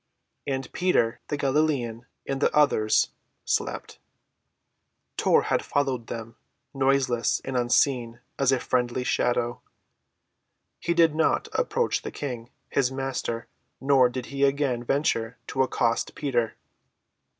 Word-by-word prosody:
And 135 -2 -3
Peter, 175 -11 +1
the 145 - -2
Galilean, 135 -5 0 0.2
and 135 0 -3
the - - +3
others—slept. 140 -8 0 1.2
Tor - - +3
had - - 0
followed 135 -5 -1
them, 115 0 -7 0.4
noiseless 135 -3 +2
and 135 - -4
unseen 120 -1 +2 0.2
as 135 -1 +3
a 130 - +2
friendly 125 0 0
shadow. 120 -1 0 1.2
He 170 - -1
did 165 -2 +5
not 160 +1 +1
approach 485 -1 0
the - - -5
King, 120 -5 -5 0.2
his 135 -2 +1
Master, 130 -3 -3 0.3
nor 135 -2 +4
did 125 0 -5
he 140 0 0
again 135 -3 +1
venture 120 -4 0
to 135 - -1
accost 120 -3 0
Peter. 120 -6 -1
130 Hz, 115 wpm, -26 LUFS, 120-140 Hz, 1.2 s, did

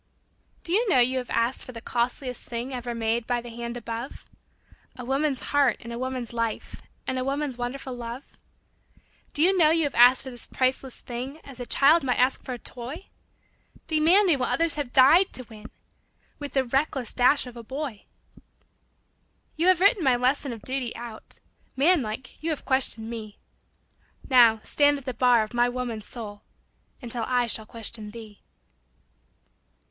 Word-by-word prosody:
] - - -39
Do 335 - -6
you 440 +4 +2
know 315 - +4
you 255 +1 +3
have 250 - -7
asked 230 +3 +1
for 255 - -10
the 230 - -7
costliest 245 +2 -3
thing 240 +3 -4
Ever 240 -1 -4
made 230 0 -1
by 245 -1 0
the 240 0 -9
hand 235 +1 -6
above 235 +2 -7 0.7
A 250 - -8
woman's 270 +1 0
heart 280 -5 +3
and 235 0 -8
a 235 - -5
woman's 255 -2 -4
life 230 -2 -3 0.2
And 260 - -2
a - - -1
woman's 275 0 -2
wonderful 250 +2 -5
love? 240 +2 -8 1.0
Do 295 - +2
you 380 +3 +4
know 325 -4 +5
you 325 0 +3
have 290 - -1
asked 245 +2 +6
for 260 - -7
this 240 -2 -1
priceless 260 0 -1
thing 255 +5 -6
As 270 -3 -12
a 245 - -5
child 305 +5 +5
might 250 -2 0
ask 255 +2 +2
for 255 - -5
a - - -5
toy, 255 +10 -5 0.8
Demanding 330 +1 +4
what 255 - 0
others 330 -2 +3
have 285 -5 -3
died 310 +10 +5
to 255 - -3
win, 220 -3 -13 0.7
With 285 -1 -6
the 270 - +2
reckless 270 0 -1
dash 260 +3 +3
of 250 -1 -10
a 235 - -8
boy? 260 -2 -6 1.5
You 335 +3 +1
have 370 -2 +4
written 400 -1 +4
my 260 -3 +4
lesson 255 +2 0
of 225 -3 -8
duty 260 -2 -3
out, 235 -2 -7 0.4
Man 315 +4 +4
like 230 +3 -7
you 325 - -2
have 310 - -3
questioned 255 -4 0
me; 220 -3 -7 0.9
Now 235 -4 +5
stand 290 0 +3
at 275 - -11
the 255 - -3
bar 245 -1 +4
of 215 - -9
my 240 0 +3
woman's 245 -4 -4
soul 205 -4 -6 0.6
Until 235 -1 +2
I 250 -1 +2
shall 220 -1 0
question 225 -1 -2
thee. 215 -2 -12
250 Hz, 180 wpm, -26 LUFS, 235-280 Hz, 1.5 s, asked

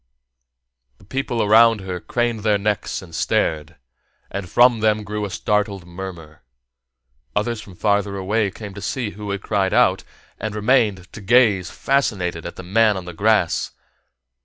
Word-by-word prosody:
The - - -20
people 120 +1 -2
around 110 +1 +5
her 90 -1 -5
craned 120 +3 -1
their 105 -1 +2
necks 105 -1 -2
and 85 -3 -14
stared, 80 0 -1 0.6
and 95 -2 -5
from 120 +1 +5
them 110 0 +1
grew 105 +1 -3
a - - -5
startled 105 -2 -1
murmur. 85 -4 -9 0.9
Others 115 +1 -1
from 95 -4 -13
farther 100 0 0
away 100 +2 0
came 100 +1 -9
to 100 - -9
see 120 -2 -3
who 105 0 -8
had 100 0 -3
cried 100 -3 0
out, - - +3 0.4
and 105 0 -4
remained 105 -5 +1
to 105 - -9
gaze 100 -4 +3
fascinated 95 -12 -1
at 85 - -8
the 95 - -9
man 105 +2 +3
on 95 - -6
the 90 - -7
grass. 105 -1 +1
105 Hz, 160 wpm, -21 LUFS, 95-110 Hz, 0.9 s, around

